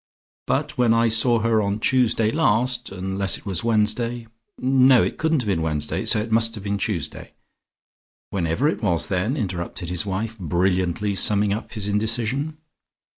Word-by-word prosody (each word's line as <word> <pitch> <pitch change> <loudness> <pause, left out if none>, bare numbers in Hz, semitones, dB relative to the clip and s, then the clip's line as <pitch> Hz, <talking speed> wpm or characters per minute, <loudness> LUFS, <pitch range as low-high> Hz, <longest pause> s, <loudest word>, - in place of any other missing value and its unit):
But - - -1
when 115 -2 +4
I 115 0 +3
saw 115 +1 +3
her 115 -1 +2
on 100 +1 -1
Tuesday 115 -3 +2
last, 125 -4 +1
unless 95 +1 -1
it - - -17
was 95 -2 -2
Wednesday, 115 +1 0 0.3
no, 130 -1 +4
it - - -3
couldn't 160 -3 +1
have - - -7
been 95 -5 0
Wednesday, 75 -2 -2
so - - +4
it 110 +2 -4
must 115 +1 +3
have 105 - -8
been 100 0 -2
Tuesday 95 -9 -4 0.5
" - - -88
"Whenever 90 - 0
it 155 - -1
was 85 -6 0
then," 100 +9 -1
interrupted 90 - -4
his 90 -2 -2
wife, 105 +3 -4
brilliantly 90 +3 0
summing 100 +1 +2
up 110 - -6
his 105 -3 -4
indecision. 115 +8 -1
110 Hz, 170 wpm, -22 LUFS, 95-115 Hz, 0.5 s, when